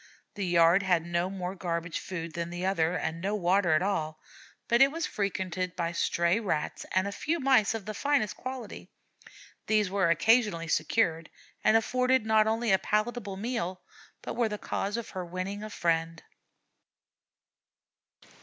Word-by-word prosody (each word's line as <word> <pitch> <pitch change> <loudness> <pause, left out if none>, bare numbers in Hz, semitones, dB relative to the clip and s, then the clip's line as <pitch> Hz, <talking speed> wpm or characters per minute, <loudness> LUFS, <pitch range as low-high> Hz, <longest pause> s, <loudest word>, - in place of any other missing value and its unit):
The 200 -4 -3
yard 170 +2 +5
had 175 -4 +1
no 170 +1 -1
more 185 -1 -4
garbage 170 -2 -3
food 165 -3 -6
than 170 0 -3
the 175 +1 -4
other 180 -2 +1
and 160 +1 -3
no 200 +3 -1
water 185 -2 +2
at 155 - +3
all, 160 -6 -2 0.5
but 235 +1 +3
it 275 +1 +7
was 330 +1 -2
frequented 185 -3 -2
by 170 -1 -1
stray 170 +3 +1
Rats 175 -9 -3
and 185 +1 +2
a - - -3
few 320 +11 -2
Mice 260 -6 +3
of 215 -4 -6
the 215 - -4
finest 280 -3 0
quality; 255 -3 -7 0.8
these 210 -3 +2
were 195 -3 +2
occasionally 170 -1 +3
secured, 165 0 +1 0.3
and 220 - +5
afforded 250 +1 +1
not 220 -1 +4
only 225 0 +1
a 190 - +5
palatable 215 -2 -1
meal, 195 -5 -3 0.4
but - - -5
were 235 -2 +1
the 210 - -4
cause 205 +1 -3
of 235 - -6
her 185 -2 -4
winning 185 +4 -5
a 215 - -6
friend. 165 -3 -1
190 Hz, 165 wpm, -29 LUFS, 170-220 Hz, 0.8 s, it